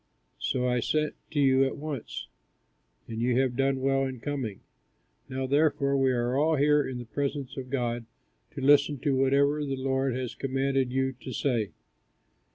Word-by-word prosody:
So 125 -1 0
I 125 0 +2
sent 150 +5 0 0.2
to 150 - -2
you 135 -1 +5
at 135 - -1
once; 145 -5 -5 0.8
and 115 0 -4
you 125 +1 +2
have 130 -2 +1
done 135 0 +1
well 135 0 +2
in 130 -2 -4
coming. 130 -7 -4 0.7
Now 130 0 -2
therefore 140 0 +2
we 135 -1 +3
are 120 0 0
all 155 +3 +3
here 150 +1 +4
in 130 -3 -4
the 120 - -6
presence 140 +3 -3
of 130 -2 -6
God, 120 -3 -2 0.5
to - - -4
listen 145 +1 +5
to 140 -1 +1
whatever 140 +3 +3
the 135 -2 -2
Lord 135 -1 0
has 130 -2 -3
commanded 135 -1 0
you 130 0 +1
to 130 - -7
say." 115 -5 0
135 Hz, 170 wpm, -28 LUFS, 125-140 Hz, 0.8 s, you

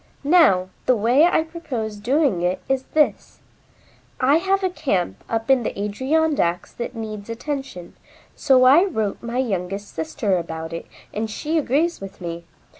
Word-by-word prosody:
Now, 280 - +4 0.2
the 255 - +5
way 240 +8 +4
I 345 -2 +3
propose 255 -10 -5
doing 255 - +1
it 180 +1 0
is 265 -1 0
this: 305 -1 +1 0.8
I 275 +4 +4
have 385 +3 0
a 375 - +2
camp 190 - -2
up 225 +3 0
in 265 -2 +5
the 215 - -4
Adirondacks 260 - 0
that 240 +1 -6
needs 215 -2 -6
attention, 260 - -5 0.4
so 265 -3 +4
I 275 +7 +7
wrote 220 - -2
my 235 +1 -4
youngest 200 -4 -2
sister 165 +5 -1
about 160 -1 -6
it 165 - -6 0.3
and 220 +1 -2
she 300 +9 -3
agrees 305 +3 0
with 195 0 -9
me. 170 -1 -6
235 Hz, 155 wpm, -22 LUFS, 195-290 Hz, 0.8 s, I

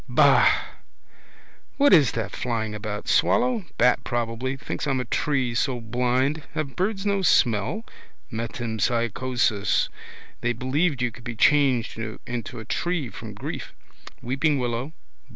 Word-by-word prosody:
Ba. - - +6 1.3
What 285 0 +5
is 150 -7 +6
that 110 -5 -3
flying 115 -3 -2
about? 105 -1 -5
Swallow? 240 -4 +2
Bat 125 +1 +3
probably. 120 +3 -2
Thinks 150 - -4
I'm 135 -2 +1
a 125 - -2
tree, 130 0 0
so 125 +1 0
blind. 125 +6 0
Have 145 -4 -3
birds 195 +1 -1
no 200 -1 +1
smell? 120 - +2 0.5
Metempsychosis. 115 -1 0 0.5
They 120 0 +1
believed 130 +3 0
you 120 - 0
could 120 +2 -14
be 115 0 -5
changed 130 -3 +3 0.3
into 120 -1 -5
a 110 - -8
tree 170 +1 -1
from - - -9
grief. - - -6 0.5
Weeping 135 +4 +1
willow. 125 +3 -2
125 Hz, 130 wpm, -25 LUFS, 115-145 Hz, 1.3 s, Ba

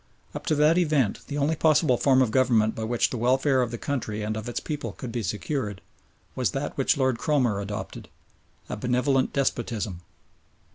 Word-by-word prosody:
Up - - -7
to 155 - +2
that 155 +4 +4
event 150 - +1
the 145 - -4
only 145 +3 +1
possible 155 -3 +3
form 130 +1 +4
of 115 - -1
Government 115 -4 +3
by 110 - -5
which 120 +1 +1
the 125 - -3
welfare 130 +2 +2
of 120 - 0
the 120 - -5
country 110 -6 -3
and 110 +1 -2
of 110 +2 -5
its 120 - -2
people 150 -2 -5
could 125 - -7
be 120 0 -2
secured, 105 -1 -3 0.5
was - - -1
that - - -4
which - - +2
Lord 130 -3 +1
Cromer 125 -10 +1
adopted 105 +1 -6 0.6
a - - -4
"benevolent 125 +4 +1
despotism." 115 -9 -2
125 Hz, 185 wpm, -26 LUFS, 110-140 Hz, 0.6 s, that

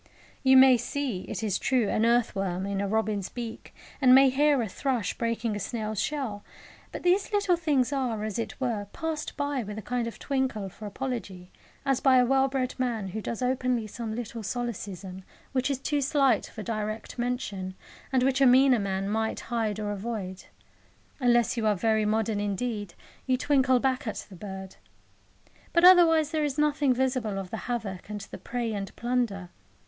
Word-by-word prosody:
You 265 -1 +6
may 260 -1 +8
see, 250 -5 -3
it - - -4
is 205 -3 0
true, 250 -5 +2
an 220 +3 +2
earth 235 -1 +2
worm 190 -1 -2
in 200 0 -2
a 200 - -1
robin's 215 -2 -1
beak, 235 -2 -7 0.3
and 255 -1 +7
may 270 0 +7
hear 290 +1 +3
a - - -3
thrush 235 0 -1
breaking 230 -1 -1
a - - -3
snail's 215 0 -3
shell; 255 -9 -3 0.5
but - - -7
these 365 +4 +2
little 405 -3 +3
things 290 -6 +1
are, 245 -6 -1
as 215 0 -3
it 230 - -4
were, 230 -6 -2
passed 320 -2 -4
by 285 -2 -1
with 210 -1 -6
a - - -4
kind 245 +1 -2
of 230 - -7
twinkle 265 -8 -2
for 210 +3 -9
apology, 200 -6 -5 0.3
as 270 -2 +2
by 265 -1 +5
a 250 - +5
well 270 +1 +3
bred 260 -2 -2
man 230 -6 -1
who 220 +4 -4
does 230 +3 -4
openly 250 -2 0
some 220 +1 -5
little 235 -1 -5
solecism 195 -5 -5 0.3
which 260 0 0
is 275 - 0
too 290 +2 -1
slight 275 -1 +2
for 215 - -8
direct 215 +1 -4
mention, 205 -7 -3 0.4
and 260 -1 +2
which 270 +1 +2
a 270 - +7
meaner 255 0 +6
man 195 -1 -2
might 220 +2 -1
hide 220 -3 -1
or 210 -1 -2
avoid. 200 -3 -5 0.7
Unless 240 -2 +3
you 220 -2 +1
are 210 - +3
very 220 +2 +1
modern 215 0 0
indeed, 205 -2 -3 0.3
you 255 -1 +2
twinkle 260 -2 +3
back 260 0 0
at 215 - -4
the - - -9
bird. 190 0 -8 1.0
But 340 - +4
otherwise 330 -4 +7
there 310 -2 0
is 290 -1 -2
nothing 295 -2 +2
visible 255 -5 0
of 190 -2 -5
the 225 - -6
havoc 205 -6 -4
and 210 -1 -5
the 195 - -9
prey 235 -2 -3
and 195 -2 -5
plunder. 235 -7 -1
235 Hz, 185 wpm, -27 LUFS, 210-265 Hz, 1.0 s, may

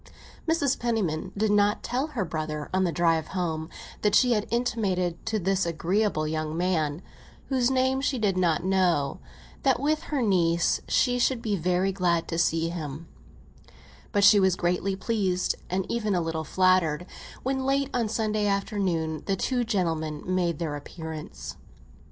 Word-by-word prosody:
Mrs. 290 -5 +1
Penniman 190 -8 -1
did 215 0 +2
not 205 0 +3
tell 260 +5 -1
her 250 -11 -2
brother, 155 -2 -4
on 190 0 +2
the 175 - 0
drive 165 -1 +1
home, 160 -3 -2 0.3
that 210 -1 +3
she 250 -2 +5
had 210 -3 +1
intimated 200 -8 -1
to 220 - 0
this 195 0 +1
agreeable 170 0 0
young 155 0 -2
man, 170 -3 0 0.5
whose 255 -2 +2
name 260 0 +2
she 275 -1 0
did 205 -4 +1
not 175 -3 +1
know, 180 -7 +1 0.4
that, 270 -2 +2
with 305 +4 0
her 285 -4 -1
niece, 170 -5 +2
she 245 -1 +2
should 250 0 +2
be 220 -3 -1
very 180 +2 +1
glad 175 -3 +1
to 165 - -1
see 165 0 +1
him; 160 -2 -6 1.0
but 205 -2 +2
she 205 +1 +8
was 190 -2 +3
greatly 180 +2 0
pleased, 190 -3 0 0.2
and 185 +1 -1
even 215 -4 -1
a 175 - +1
little 165 -1 -2
flattered, 180 -2 +2 0.4
when, 265 0 -1
late 275 +1 +1
on 240 -2 +1
a - - -7
Sunday 215 -1 0
afternoon, 190 -6 -1
the 195 - +2
two 245 +5 0
gentlemen 165 -8 -1
made 180 -3 0
their 155 -3 -3
appearance. 160 +1 -7
185 Hz, 165 wpm, -27 LUFS, 165-220 Hz, 1.0 s, she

